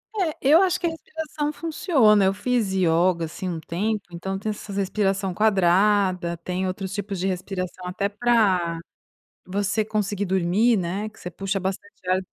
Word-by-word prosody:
É. 350 -7 -1
Eu 300 +6 +6
acho 370 -1 +2
que 345 - 0
a - - +1
respiração 310 -2 -4
funciona. 270 - +3
Eu 190 - +3
fiz 220 0 0
yoga, 170 -1 +2
assim, 180 +3 -5
um 165 -2 -3
tempo, 205 +6 -2
então, 190 +3 -4
tem 215 +2 -4
essas 205 -1 -5
respiração 195 -1 0
quadrada. 190 -3 +2
Tem 180 +2 -3
outros 190 +1 -4
tipos 200 -1 -4
de 190 - 0
respiração, 185 -1 -4
até 195 +2 -1
pra 205 -7 +2 0.7
você 205 +3 0
conseguir 205 -2 -1
dormir, 190 +5 +2
né, 190 +4 -2
que - - -21
você 180 - -6
puxa 195 +2 -2
bastante 190 0 -6
ar, 185 0 +3
195 Hz, 165 wpm, -24 LUFS, 185-215 Hz, 0.7 s, Eu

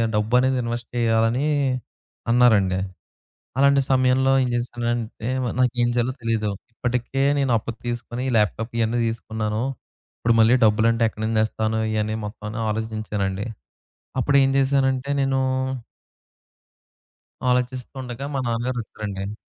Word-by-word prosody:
డబ్బు 105 +2 0
అనేది 130 0 +2
ఇన్వెస్ట్ 120 0 -4
చేయాలని 115 +4 +2 0.8
అన్నారండి. 110 -6 +4 0.8
అలాంటి 140 0 +5
సమయంలో 130 +1 +3
ఏం 125 - 0
జేసానంటే, 120 -1 -2 0.3
నాకేం 120 -1 +2
చేయాలో 120 +2 +1
తెలియదు. 110 -2 0 0.2
ఇప్పటికే 125 +3 -1 0.2
నేను 135 -3 +1
అప్పు 115 - -5 0.2
తీసుకొని 120 +1 -4
ల్యాప్‌‌టాప్ 110 +2 0
ఇయన్నీ 115 +1 +1
తీసుకున్నాను. 110 -1 -2 0.6
ఇప్పుడు 115 0 +2
మళ్ళీ 110 +2 +6
డబ్బులంటే 115 +2 +3
ఎక్కడి 110 - -8
నుండి 110 0 +1
తెస్తాను. 110 0 -1
ఇయన్ని 110 0 -1
మొత్తం. 105 0 -7 0.2
ఆలోచించానండి 105 -3 -2 0.7
అప్పుడు 140 +2 +1
ఏం 135 - +3
చేశానంటే 135 -1 +1
నేనూ 135 -1 +1 2.1
ఆలోచిస్తుండగా 125 +1 -2
మా 135 - 0
నాన్నగారు 120 +2 -1
వచ్చారండి. 100 -1 -6
115 Hz, 110 wpm, -23 LUFS, 110-125 Hz, 2.1 s, మళ్ళీ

